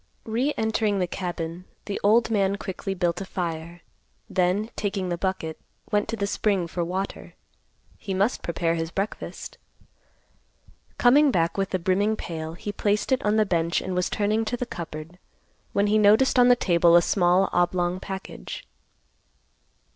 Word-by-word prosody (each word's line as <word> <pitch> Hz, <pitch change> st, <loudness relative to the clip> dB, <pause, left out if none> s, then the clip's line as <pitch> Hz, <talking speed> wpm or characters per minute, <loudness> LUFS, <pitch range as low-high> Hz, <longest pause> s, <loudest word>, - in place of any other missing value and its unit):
Re 240 Hz, +6 st, 0 dB
entering 220 Hz, -2 st, +1 dB
the 185 Hz, -, +1 dB
cabin, 175 Hz, -1 st, -5 dB, 0.2 s
the 200 Hz, -, -4 dB
old 225 Hz, +3 st, +4 dB
man 200 Hz, -2 st, +2 dB
quickly 195 Hz, 0 st, -5 dB
built 175 Hz, 0 st, 0 dB
a -, -, -4 dB
fire, 170 Hz, -2 st, -5 dB, 0.5 s
then, 190 Hz, +5 st, 0 dB
taking 195 Hz, -3 st, -2 dB
the 175 Hz, -, 0 dB
bucket, 175 Hz, -4 st, -3 dB, 0.3 s
went 205 Hz, 0 st, +1 dB
to 230 Hz, -, -1 dB
the 200 Hz, -2 st, -1 dB
spring 200 Hz, -2 st, 0 dB
for 170 Hz, +1 st, -3 dB
water. 185 Hz, +3 st, -4 dB, 0.6 s
He 195 Hz, -3 st, -4 dB
must 200 Hz, +6 st, +1 dB
prepare 170 Hz, -1 st, -1 dB
his 165 Hz, -1 st, -2 dB
breakfast. 195 Hz, +5 st, -5 dB, 1.4 s
Coming 280 Hz, +4 st, +5 dB
back 170 Hz, -8 st, +1 dB
with 195 Hz, -1 st, -1 dB
the 185 Hz, -, 0 dB
brimming 195 Hz, +4 st, +1 dB
pail, 160 Hz, -4 st, -5 dB
he 205 Hz, +4 st, -5 dB
placed 205 Hz, +3 st, 0 dB
it 260 Hz, -, +2 dB
on 210 Hz, 0 st, +2 dB
the 215 Hz, -1 st, +4 dB
bench 170 Hz, -2 st, +1 dB
and 185 Hz, -, -4 dB
was 180 Hz, 0 st, 0 dB
turning 215 Hz, +1 st, +1 dB
to 245 Hz, +3 st, -2 dB
the 250 Hz, -, -2 dB
cupboard, 165 Hz, -3 st, -8 dB, 0.5 s
when 200 Hz, -, +2 dB
he 210 Hz, +1 st, +3 dB
noticed 215 Hz, +6 st, +5 dB
on 245 Hz, -, +7 dB
the 245 Hz, -, +7 dB
table 170 Hz, -6 st, +4 dB
a 175 Hz, -, +8 dB
small 180 Hz, +1 st, +3 dB
oblong 175 Hz, 0 st, +1 dB
package. 190 Hz, -, -7 dB
190 Hz, 160 wpm, -25 LUFS, 175-210 Hz, 1.4 s, a